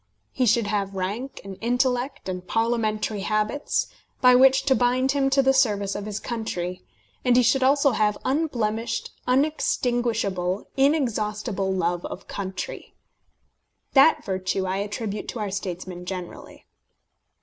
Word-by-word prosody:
He 255 -2 +1
should 225 +1 +3
have 200 -1 -2
rank, 205 +8 -4
and 195 -1 -9
intellect, 245 +2 0
and 180 -1 -5
parliamentary 220 -2 0
habits, 215 +7 0 0.3
by 250 0 +6
which 265 +1 +6
to 275 - +3
bind 255 +1 +2
him 275 -1 +1
to 275 0 +3
the 270 0 +4
service 205 -6 +2
of 205 0 -5
his 210 0 -4
country; 185 -6 -4 0.4
and 250 -1 +3
he 250 - +5
should 265 +4 +3
also 280 +1 +4
have 210 -2 +1
unblemished, 235 -6 -1 0.2
unextinguishable, 240 - 0
inexhaustible 215 -8 0
love 175 -2 -1
of 185 - -9
country. 190 -2 -6 1.0
That 275 +3 +5
virtue 190 0 -1
I 190 +1 -1
attribute 205 +1 -4
to 235 - -5
our 205 -2 -3
statesmen 180 -2 -5
generally. 180 -2 -7
220 Hz, 135 wpm, -24 LUFS, 195-255 Hz, 1.0 s, by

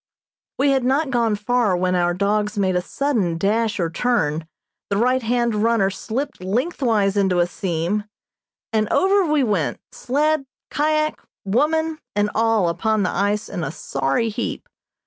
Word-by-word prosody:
We 280 +1 +3
had 265 -2 +2
not 270 +3 +1
gone 230 -4 +2
far 210 -2 +1
when 180 0 0
our 175 -1 +1
dogs 210 +2 0
made 190 -2 +1
a 180 - +2
sudden 205 - -1
dash 215 +4 0
or 170 -2 0
turn, 165 -9 0 0.4
the 200 - 0
right 255 +4 +2
hand 235 0 +1
runner 210 -2 +2
slipped 255 +6 -4
lengthwise 220 - 0
into 190 -3 +2
a 175 - +4
seam, 180 +3 -2 0.7
and 215 -1 +1
over 385 -4 +3
we 300 -3 +3
went, 200 - 0
sled, 290 +2 0 0.2
kyak, 305 +1 0 0.2
woman 310 +9 +1 0.2
and 210 0 +1
all 225 -4 +2
upon 210 +5 0
the 185 - 0
ice 205 +3 0
in 175 - -4
a 135 - -2
sorry 135 +8 -1
heap. 210 - -4
215 Hz, 155 wpm, -21 LUFS, 190-255 Hz, 0.7 s, a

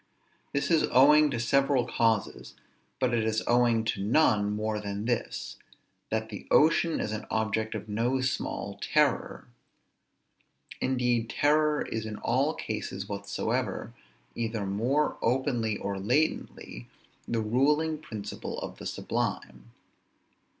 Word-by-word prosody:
This 140 +4 -1
is 165 - +4
owing 150 +3 +6
to 120 - -2
several 135 +1 +2
causes; 115 -3 0 0.4
but 125 -2 +1
it 115 -2 +2
is 110 0 0
owing 120 -2 +3
to 100 -3 -1
none 105 -3 +3
more 110 0 -2
than 100 0 -4
this, 120 -1 -3 0.5
that 110 0 -2
the 105 -3 -8
ocean 160 +1 +4
is 105 - -2
an 110 0 -5
object 110 0 -1
of 105 0 -6
no 115 +5 0
small 130 0 -3
terror. - - +1 1.4
Indeed 125 -3 +1
terror 150 0 +2
is 110 -1 -4
in 110 - -5
all 135 +6 +1
cases 100 -2 -5
whatsoever, 100 0 -3 0.4
either 115 -3 -3
more 120 +10 0
openly 120 -3 0
or 100 -1 -4
latently, 105 - -1 0.4
the 115 -1 0
ruling 150 +8 +1
principle 105 -9 -6
of - - -7
the - - -5
sublime. - - -3
115 Hz, 125 wpm, -28 LUFS, 105-135 Hz, 1.4 s, owing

